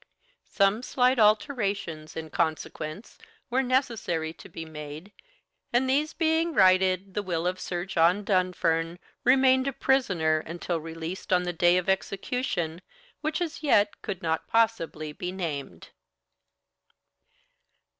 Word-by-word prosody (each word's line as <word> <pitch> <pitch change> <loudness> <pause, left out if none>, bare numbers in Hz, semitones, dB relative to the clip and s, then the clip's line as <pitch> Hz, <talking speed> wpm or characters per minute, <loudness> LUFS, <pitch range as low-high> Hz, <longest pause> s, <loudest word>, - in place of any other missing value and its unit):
Some 200 +3 +2
slight 255 0 +2
alterations, 205 - +1
in 160 -1 -6
consequence, 155 +3 -3 0.3
were 260 +2 +3
necessary 230 - 0
to 145 - -14
be 165 -1 -7
made, 155 +4 -9 0.6
and 245 +2 +2
these 295 +4 +1
being 325 0 +1
righted, 185 0 +4
the 205 - -1
will 175 -4 -2
of 185 +1 -1
Sir 175 -1 -3
John 180 +2 +2
Dunfern 175 -4 +1 0.3
remained 260 +1 +4
a 275 - -1
prisoner 185 -14 +2
until 170 +1 -4
released 165 +4 -7
on 180 -1 +4
the 175 0 -2
day 175 +1 +4
of 180 - -1
execution, 190 -3 -1 0.4
which 310 0 -1
as 330 -3 -3
yet 210 -9 +2
could 195 -5 -5
not 160 -1 -1
possibly 170 -9 0
be 180 +3 -5
named. 145 - -5
185 Hz, 125 wpm, -27 LUFS, 165-240 Hz, 0.6 s, righted